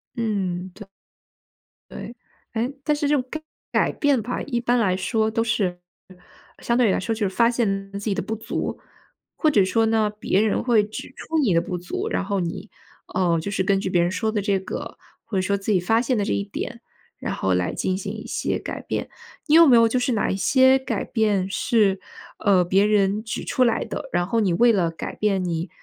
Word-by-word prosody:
嗯， 190 -6 -2
对。 210 0 -11 1.0
对。 235 - -8 0.4
哎， 235 +3 -1
但 300 +1 +2
是 295 0 -1
这 295 - +3
种 255 - -1
改 315 - -5 0.3
改 - - +2
变 285 -5 +1
吧， 245 +4 -3
一 240 -4 -2
般 245 +1 +1
来 190 -5 +2
说 220 +3 0
都 225 +1 0
是 195 -6 -1 0.3
呃， 185 - -16 0.5
相 235 - +1
对 245 -2 +4
于 - - +3
来 - - +1
说， 225 +4 -2
就 215 -2 -1
是 190 - -6
发 235 -1 +4
现 195 -5 -1
自 200 - -4
己 205 -1 -2
的 - - -1
不 220 - -4
足， 220 - -4 0.6
或 310 - +2
者 205 -8 +4
说 225 +4 +2
呢， 220 -1 +2
别 195 0 +2
人 220 -1 +1
会 235 -4 +4
指 210 +1 -7
出 325 - -3
你 240 -11 +2
的 170 - +3
不 180 0 -4
足， 175 +1 -4
然 - - -1
后 200 0 -1
你， 175 +4 -4 0.4
呃， 170 -3 +2
就 180 +5 -4
是 195 - 0
根 195 0 +2
据 195 - -3
别 175 -1 +2
人 175 - +2
说 220 +4 -1
的 210 -2 -1
这 200 -1 +1
个， 190 - -6 0.3
或 220 -4 -3
者 - - +2
说 200 +2 0
自 200 +2 -2
己 190 - +4
发 225 +6 +2
现 255 0 0
的 205 - 0
这 - - 0
一 100 0 0
点， 100 - -6 0.4
然 - - -3
后 95 -1 0
来 90 0 0
进 185 - -1
行 200 +1 -5
一 215 - -8
些 - - -2
改 - - -6
变。 - - -4 0.4
你 300 - +1
有 335 0 +8
没 255 - +7
有 230 -1 +6
就 250 +3 0
是 250 0 0
哪 215 - 0
一 - - -1
些 260 +6 +4
改 265 - -3
变 210 -5 +1
是， 200 -2 +2 0.4
呃， 190 -3 +4
别 195 +3 +3
人 210 0 +2
指 225 - -4
出 255 - +2
来 235 -2 +1
的， - - -6
然 175 0 +1
后 225 +5 0
你 195 -5 +2
为 235 +7 +5
了 185 -6 +2
改 165 - -6
变 200 -3 0
你 170 0 -2
210 Hz, 250 characters per minute, -23 LUFS, 190-230 Hz, 1.0 s, 有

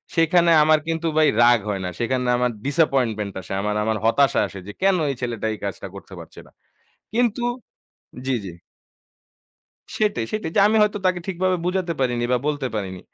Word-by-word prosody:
সেখানে 170 +1 +4
আমার 155 0 +4
কিন্তু 165 0 -1
ভাই 155 -1 +5
রাগ 120 -1 +6
হয় 100 -2 -2
না। - - -2
সেখানে 125 +1 -1
আমার 125 0 +1
disappointment 130 -9 +1
আসে। 80 - -13
আমার, 105 0 -1
আমার 110 0 0
হতাশা 135 +4 +3
আসে 100 - -10
যে, - - -6
কেন 195 -1 +4
এই 135 - -2
ছেলেটা 115 -3 -3
এই - - -7
কাজটা 95 0 -5
করতে 100 0 -11
পারছে 80 - -12
না। - - -21 0.6
কিন্তু 240 0 +1 0.8
জি, 130 - 0
জি। 90 - -6 1.5
সেটাই 210 - 0
সেটাই 215 -6 -3
যে, - - +6
আমি 220 - +2
হয়তো 210 0 +1
তাকে 180 -1 +1
ঠিকভাবে 185 0 0
বুঝাতে 180 -1 -1
পারিনি 120 -2 0
বা 125 - +3
বলতে 145 -3 -1
পারিনি। 95 -3 -4
135 Hz, 180 wpm, -22 LUFS, 110-175 Hz, 1.5 s, রাগ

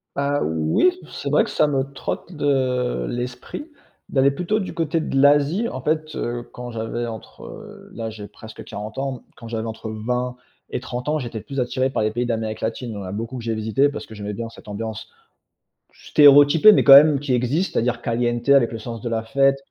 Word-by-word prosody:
Heu, 140 +1 0
oui, 80 - +2 0.2
c'est - - -5
vrai - - +4
que - - -6
ça 150 - +2
me 135 -2 0
trotte 155 - -5
de 130 - 0
l'esprit, 125 - -5 0.4
d'aller 135 0 +3
plutôt 180 +8 -1
du 190 - -5
côté 165 -1 -1
de 135 -3 -1
l'Asie. 145 +10 +4
En 130 - -6
fait, 155 +2 -1
heu, 120 0 -3
quand 125 0 -7
j'avais 115 +1 -3
entre, 110 -2 -9
heu - - -11
là, 115 -1 -4
j'ai 105 -2 -9
presque 110 +1 -12
40 105 +1 -8
ans. 135 -2 -3
Quand 115 - -11
j'avais 115 -1 -3
entre 110 0 -6
20 125 +3 -2 0.3
et - - -3
30 125 +2 -6
ans, 155 0 +1
j'étais 120 -4 -5
plus 135 +4 -6
attiré 130 +1 0
par 130 - -1
les 110 - +1
pays 120 +3 -1
d'Amérique 110 -2 -3
Latine. 115 +2 -3
Il - - -6
y - - -6
en 100 - -6
a 90 - -6
beaucoup 115 +5 -5
que 120 - -7
j'ai 115 0 -1
visité 110 +6 +1
parce 145 - -7
que 110 - -12
j'aimais 105 0 -5
bien 115 +2 -5
cette 115 - -16
ambiance 110 +1 -6 0.8
stéréotypée, 145 +6 +6
mais - - +3
quand 140 - +8
même 145 +1 +8
qui 145 -2 -2
existe, 130 +10 0
c'est-à-dire 120 +1 0
caliente, 120 +1 -1
avec 135 -4 +5
le 115 - -5
sens 115 0 -7
de 120 - -4
la 115 -1 -1
fête. 135 +4 +2
125 Hz, 215 wpm, -22 LUFS, 115-140 Hz, 0.8 s, quand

